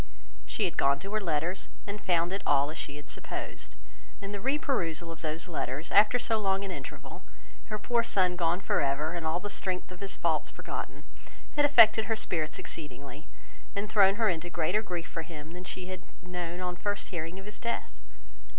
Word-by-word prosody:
She - - +1
had - - -2
gone 140 0 +4
to 195 +8 -7
her 215 - +2
letters, 170 +1 -1 0.2
and 205 0 -5
found 175 0 +2
it 195 - -1
all 145 +1 +3
as 160 - -8
she 145 +1 -5
supposed; - - -6 0.4
and 200 -1 -6
the 200 - -4
re 270 +5 +2
perusal 170 - -1
of 165 - -9
these 160 +2 -2
letters, 150 -2 -3
after 210 +4 +7
so 230 -2 +1
long 195 -1 +1
an 195 - -3
interval, - - -7 0.4
her 215 - -3
poor 235 +3 +2
son 185 -5 +3
gone 175 +1 +1
for - - +2
ever, 145 +3 +1
and 170 -2 -2
all 160 +2 +1
the 205 +2 -5
strength 185 -2 -1
of 180 - -9
his 195 -1 -2
faults - - +1
forgotten, - - -6 0.5
had 290 -1 +5
affected 225 -6 +8
her 225 - +1
spirits 160 -7 0
exceedingly, 140 0 -7 0.5
and 205 +1 -2
thrown 195 -2 +6
her 225 0 +3
into 175 -2 0
greater 175 +5 +1
grief 175 -5 -4
for 165 - -4
him 160 -1 -8
than 180 +1 -8
she 185 0 -4
had 185 -1 -5 0.2
known 180 -1 -4
on 180 -1 -2
first 205 +1 -2
hearing 170 0 -4
of 195 - -8
his 210 0 -9
death. 235 - -3
180 Hz, 200 wpm, -30 LUFS, 165-205 Hz, 0.5 s, affected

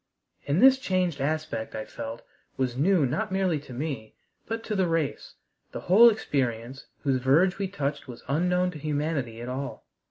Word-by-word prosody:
And 150 - +2
this 265 0 +7
changed 185 - 0
aspect 155 -5 -2
I 110 - -4
felt 115 +1 -7 0.3
was 130 -2 -1
new 165 +3 +3
not 210 - -2
merely 190 -5 +1
to 145 - -13
me, 125 -4 -5 0.3
but 225 0 -3
to 215 - -3
the 190 -2 +2
race. 165 -4 -2 0.4
The - - -5
whole 220 +7 +7
experience 130 - -2 0.2
whose 135 -3 +1
verge 170 +9 +3
we 195 - 0
touched 145 -8 -3
was 120 -2 -10
unknown 180 +5 +1
to 155 - -9
humanity 145 -6 -2
at 120 - -6
all. 135 +2 -5
150 Hz, 170 wpm, -27 LUFS, 130-185 Hz, 0.4 s, this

